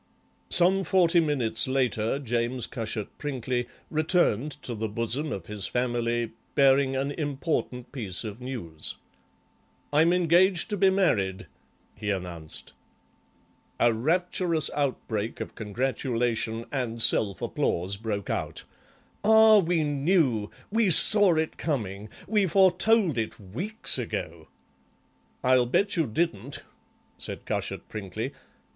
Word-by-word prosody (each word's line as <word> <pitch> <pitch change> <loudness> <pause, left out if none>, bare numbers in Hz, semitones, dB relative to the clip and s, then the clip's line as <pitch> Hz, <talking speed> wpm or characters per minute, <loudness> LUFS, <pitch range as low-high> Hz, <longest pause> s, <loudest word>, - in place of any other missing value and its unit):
Some 190 +2 +5
forty 175 -1 +3
minutes 130 -8 0
later 130 -3 0
James 120 -2 -2
Cushat 110 -3 -4
Prinkly 125 -4 -3 0.2
returned 155 - +1
to 120 - -5
the 110 0 -3
bosom 115 +8 -2
of 95 -4 -5
his 105 -1 -1
family, 120 -1 -1 0.2
bearing 135 -1 +4
an 135 +2 -1
important 145 -4 -3
piece 105 -9 -3
of 110 +1 -7
news. 85 -12 -6 1.0
"I'm 160 +3 +4
engaged 180 +2 +3
to 205 - -1
be 195 +1 +4
married," 105 - 0 0.5
he 105 - -5
announced. 90 -5 -6 1.1
A 120 -1 +4
rapturous 170 +5 0
outbreak 125 -6 -2
of - - -6
congratulation 115 0 -2
and 125 -5 -3
self 105 -3 +1
applause 90 +4 -1
broke 100 -2 -4
out. - - -4 0.6
"Ah, 220 0 +7
we 170 -3 +1
knew! 145 - +1 0.2
We 225 -2 +2
saw 200 +1 +7
it 160 0 -2
coming! 105 - -3 0.2
We 205 -2 +2
foretold 190 - +3
it 110 - -4
weeks 135 - 0
ago!" 85 -8 -5 1.0
"I'll 125 -1 +3
bet 200 +11 +1
you 165 -5 +1
didn't," 125 - -3 0.6
said - - -8
Cushat - - -4
Prinkly. 110 +5 -5
130 Hz, 115 wpm, -26 LUFS, 110-165 Hz, 1.1 s, Ah